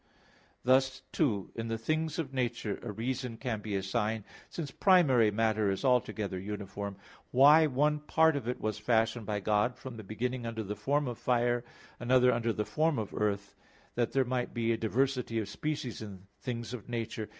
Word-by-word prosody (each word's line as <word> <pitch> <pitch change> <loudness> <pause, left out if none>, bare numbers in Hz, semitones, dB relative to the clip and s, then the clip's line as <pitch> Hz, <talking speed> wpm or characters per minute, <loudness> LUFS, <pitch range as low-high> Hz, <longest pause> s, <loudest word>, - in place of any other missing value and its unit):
Thus 130 +1 +3
too, 110 - 0
in 115 0 -4
the 115 0 -1
things 155 +7 -1
of 145 -5 -3
nature, 120 -5 -2
a 120 - -5
reason 125 +2 -3
can 115 -4 -3
be 105 -1 -3
assigned, 105 +3 -1 0.3
since 150 -5 -5
primary 140 - +5
matter 110 -1 +1
is 95 +6 -2
altogether 110 -6 +1
uniform, 100 0 -5 0.3
why 150 +5 +7
one 150 +2 +2
part 160 +1 +3
of 135 -5 -3
it 125 - -2
was 110 -1 -2
fashioned 115 0 +1
by 105 -1 -1
God 105 +5 +2
from 130 -3 -8
the 110 - -8
beginning 120 +4 -3
under 115 -1 -3
the 105 +1 -4
form 145 +3 0
of 120 -2 -5
fire, 120 0 +1 0.4
another 125 +1 +4
under 115 0 0
the 105 -1 -2
form 155 -1 +1
of 110 -3 -3
earth, 100 -1 -1 0.4
that 120 -2 0
there 135 0 +2
might 125 0 -2
be 115 -1 +1
a - - +3
diversity 125 +1 0
of 110 -3 -1
species 135 +1 -4
in 100 -3 -9
things 120 -1 -4
of 120 -1 -8
nature. 115 -2 -3
120 Hz, 185 wpm, -31 LUFS, 110-130 Hz, 0.4 s, why